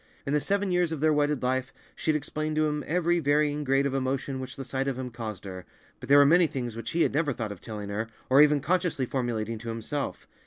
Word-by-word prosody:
In 140 - -1
the 150 - +4
seven 200 +4 0
years 180 -2 +2
of 160 - -3
their 155 +1 +3
wedded 145 -2 +1
life 130 +1 0 0.2
she - - -4
had 155 - +4
explained 155 +1 -2
to 155 0 +3
him 150 -1 -1
every 175 +1 +2
varying 150 0 +1
grade 135 0 +2
of 140 - -1
emotion 135 0 -2
which 130 -1 -6
the 135 - -6
sight 135 +1 -2
of 135 -2 -1
him 130 -1 -5
caused 110 -5 -6
her, 95 -1 -7 0.4
but - - -10
there 140 - +8
were 145 - +8
many 170 +3 +5
things 125 -7 -4
which 115 0 -5
he 170 0 +2
had - - +1
never 150 0 +1
thought 110 -3 -4
of 100 - -9
telling 105 -2 -6
her, 105 +3 -2 0.2
or 135 +2 +6
even 150 -1 +5
consciously 170 -2 0
formulating 115 -4 -2
to 115 +1 -7
himself. 115 +5 -4
140 Hz, 250 wpm, -27 LUFS, 120-150 Hz, 0.4 s, there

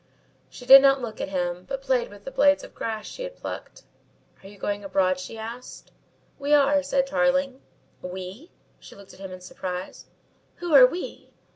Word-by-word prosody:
She 245 - -12
did 270 +2 +10
not 275 0 +4
look 235 -4 -6
at - - -3
him, 180 -1 -2
but 270 0 -5
played 260 -3 0
with 205 0 -14
the 270 - -7
blades 285 +1 +3
of - - -12
grass 220 -2 -5
she - - -9
had - - -6
plucked. - - -8 0.6
"Are 195 - -13
you 205 - -15
going 205 +1 -3
abroad?" 185 -1 +1
she 185 +5 -8
asked. 230 +3 -9 0.5
"We 285 +1 +3
are," 285 0 +4
said 275 -1 0
Tarling. 270 -1 0 0.4
"We?" 185 - -8 0.3
she - - -14
looked 200 -1 -15
at - - -17
him 195 -1 -8
in 185 0 -9
surprise. 180 0 -7 0.5
"Who 350 -3 -4
are 260 -3 +9
we?" 350 +8 -7
245 Hz, 185 wpm, -25 LUFS, 195-275 Hz, 0.6 s, did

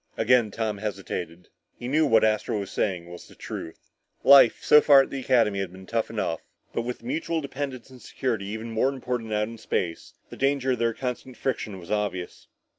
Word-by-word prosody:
Again 115 0 +3
Tom 105 -1 -3
hesitated. 90 -4 -5 0.3
He 120 - -6
knew 155 +4 +3
what 115 -4 +4
Astro 110 0 +1
was 100 -1 -6
saying 90 -4 -1
was 85 0 -11
the - - -17
truth. 80 - -8 0.3
Life, 140 -4 +7
so 150 - +7
far, 140 -2 +7
at - - -9
the 135 - -3
Academy 115 -6 +2
had 95 -2 -3
been 95 +1 -12
tough 115 +3 -1
enough, 105 -7 -2 0.3
but - - 0
with 120 +1 -5
mutual 250 - -2
dependence 135 -3 -6
and 130 -2 -14
security 115 -7 -3
even 110 +2 -5
more 115 +4 +2
important 125 -4 -4
out 105 0 0
in 115 0 -9
space, 85 -5 -3 0.2
the - - -9
danger 135 -1 +1
of 125 - -1
their 115 -1 +1
constant 125 -1 -5
friction 110 -6 -3
was 85 0 -10
obvious. 105 -4 -3
115 Hz, 195 wpm, -26 LUFS, 100-130 Hz, 0.3 s, Life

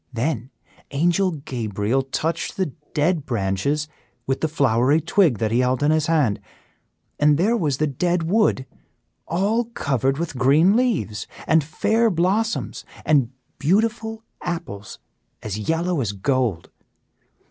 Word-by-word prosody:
"Then 125 0 -2 0.4
Angel 175 +6 +2
Gabriel 120 - -2
touched 155 +5 -3
the 185 -8 -1 0.2
dead 155 +1 +1
branches 120 +8 -1 0.4
with 135 0 -1
the 160 - +2
flowery 140 -1 +2
twig 165 - +2
that 110 0 -1
he 120 - +2
held 125 +2 +1
in 150 - +4
his 155 -1 +1
hand, 145 -11 +2 0.8
and 150 0 +4
there 210 +8 +2
was 150 - 0
the 155 - +1
dead 170 +5 0
wood 180 -6 +2 0.6
all 205 +8 +1
covered 135 - -1
with 155 -5 -4
green 155 - +5
leaves, 210 - 0 0.2
and 160 -1 +3
fair 220 +9 +1
blossoms 200 +5 0 0.2
and 140 -6 +3 0.3
beautiful 220 +6 0 0.2
apples 105 - -5 0.5
as 110 -1 -4
yellow 165 -1 +1
as 105 -4 -2
gold. 115 -4 -1
150 Hz, 130 wpm, -22 LUFS, 125-175 Hz, 0.8 s, green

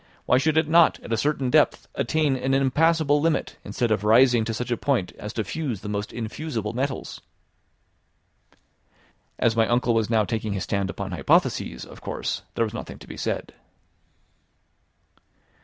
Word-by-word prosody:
Why 125 - +4
should 155 +2 +1
it 160 -1 +3
not, 165 +1 +5
at 115 - -5
a - - +4
certain 135 +1 0
depth, 155 -1 +3
attain 155 -4 +1
an 130 +1 0
impassable 145 +2 +3
limit, 165 0 0
instead 120 -4 -2
of 105 -2 +1
rising 120 +2 +5
to 115 - -2
such 125 +2 -4
a - - +3
point 120 -6 0
as 105 - -6
to 110 - -1
fuse 125 - -4
the 105 - -6
most 105 0 -3
infusible 115 -1 -4
metals?" 130 +2 -3 2.2
As 115 -1 +2
my 115 -1 +3
uncle 120 0 +2
was 115 -1 +1
now 110 -2 +3
taking 110 -2 -2
his 95 - -3
stand 100 -2 -1
upon - - -5
hypotheses, 60 - +1
of - - -13
course, - - -3
there 115 - +2
was 110 - -6
nothing - - -7
to - - -13
be - - -8
said. - - -3
120 Hz, 170 wpm, -24 LUFS, 110-145 Hz, 2.2 s, not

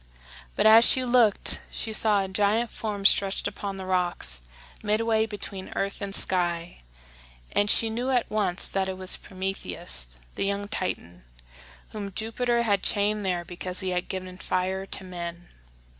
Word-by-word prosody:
But - - +1
as 220 +1 +8
she 255 +1 +5
looked 240 -4 +4
she 220 - -3
saw 210 -2 +3
a - - -4
giant 210 +4 +1
form 205 -3 -5
stretched 195 -1 +3
upon 200 -1 -5
the 190 - -7
rocks 175 - -1 0.4
midway 220 +1 +1
between 200 -3 -6
earth 195 0 -3
and 200 0 -1
sky, 175 -2 0 0.7
and 205 0 +1
she 225 +1 +5
knew 245 +4 -2
at 250 -3 +1
once 200 -4 0
that 195 -1 -1
it 190 -1 -4
was 185 0 +1
Prometheus, 185 - 0 0.3
the - - -2
young 200 +1 -2
Titan, 90 - -4 0.7
whom 200 -2 -7
Jupiter 235 +2 -1
had 200 -4 +1
chained 210 0 +1
there 180 -2 -2
because 180 +2 -4
he 190 - -2
had 180 0 -2
given 185 -1 -6
fire 190 +1 -2
to 195 - -4
men. 175 -1 -7
195 Hz, 160 wpm, -26 LUFS, 185-215 Hz, 0.7 s, as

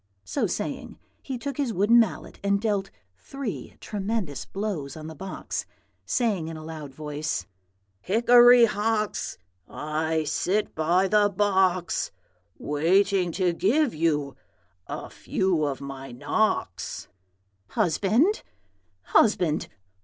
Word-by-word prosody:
So 95 - -1
saying, - - -4 0.2
he 265 - -5
took 275 +2 -5
his 280 -5 0
wooden 210 +5 +5
mallet 225 -5 -1
and 200 0 +2
dealt 200 -3 -1 0.3
three 255 - -6
tremendous 200 - -3
blows 190 -9 -4
on 155 - -8
the 160 - -7
box, 190 +6 -5 0.4
saying 210 -10 0
in 165 -1 -6
a 155 - -9
loud 155 -3 -7
voice, 150 -6 -3 0.5
'Hickory 240 - +7
Hox! 215 0 -1 0.3
I 155 +1 -1
sit 195 +7 0
by 175 +5 +2
the 205 +1 +4
box, 190 -3 +1 0.5
Waiting 180 +5 +2
to 180 -3 +1
give 235 - +2
you 150 -3 0 0.5
a - - -5
few 180 -5 0
of 140 -2 -2
my 135 -1 -7
knocks.' 120 - -1 0.6
"'Husband, 215 - +2 0.6
husband! 180 - +2
190 Hz, 115 wpm, -26 LUFS, 155-215 Hz, 0.6 s, Hickory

